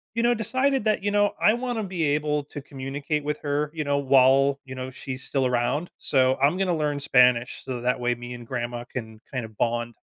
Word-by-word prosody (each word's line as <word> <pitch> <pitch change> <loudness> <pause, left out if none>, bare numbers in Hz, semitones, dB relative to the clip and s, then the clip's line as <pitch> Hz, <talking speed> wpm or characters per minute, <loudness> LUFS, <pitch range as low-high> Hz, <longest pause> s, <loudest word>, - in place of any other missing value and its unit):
you 230 - +1
know, 240 0 +4
decided 260 +3 0
that, 215 -3 +1
you 205 - +1
know, 205 0 +2
I 215 - +5
wanna 240 -2 -2
be 180 -4 -3
able 150 0 +1
to 145 - -8
communicate 140 +2 -4
with 150 0 -2
her, 145 0 -1
you 155 -2 -2
know, 145 0 +1
while, 135 +1 +4
you 130 - -8
know, 130 0 -5
she's 130 0 -7
still 135 -2 0
around. 125 +7 0
So, 130 -1 +2
I'm 145 +7 +2
gonna 185 -3 +1
learn 150 -2 -1
Spanish 125 -3 +3
so 125 -2 -5
that 125 0 0
way 120 0 0
me 120 +1 -8
and 120 -1 -9
grandma 120 -1 -4
can 110 -3 -8
kind 130 -4 -3
of 110 -1 -13
bond. 120 0 -1
140 Hz, 220 wpm, -25 LUFS, 125-155 Hz, -, I